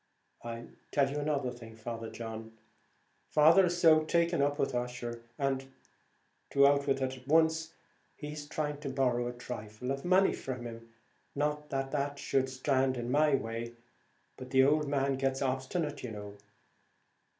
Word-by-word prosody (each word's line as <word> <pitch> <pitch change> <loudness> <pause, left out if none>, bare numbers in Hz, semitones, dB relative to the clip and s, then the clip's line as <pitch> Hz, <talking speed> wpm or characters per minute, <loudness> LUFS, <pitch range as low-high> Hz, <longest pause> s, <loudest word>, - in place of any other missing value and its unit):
"I'll 115 0 -6 0.2
tell 140 -2 +2
you 145 - -2
another 145 -4 0
thing, 115 -2 -11
Father 115 0 -6
John; 115 -1 -7 0.7
father 165 +5 +6
is 175 0 -1
so 155 -2 +6
taken 170 -1 +2
up 145 +1 +1
with 135 - 0
Ussher, 120 -1 -3 0.2
and 135 -1 -1 0.8
to 140 0 +5
out 140 0 +4
with 135 -1 +1
it 130 0 -2
at 130 +1 -16
once 160 +1 +3 0.4
he's 150 0 -7
trying 150 -1 -3
to 145 -2 -4
borrow 125 -3 +1
a - - -2
thrifle 120 0 -6
of 135 0 -3
money 185 +2 +4
from 130 -2 -5
him; 115 0 -8 0.5
not 150 +1 -1
that 135 0 -2
that 145 -1 -1
should 130 -1 0
stand 130 0 +1
in 120 0 -3
my 150 0 +4
way, 115 -1 -4 0.6
but 130 0 -9
the 130 0 +5
ould 150 +2 +3
man 140 -1 +1
gets 135 0 0
obstinate, 140 +3 -2
you 125 - -5
know." 105 -1 -8
135 Hz, 160 wpm, -31 LUFS, 120-150 Hz, 0.8 s, father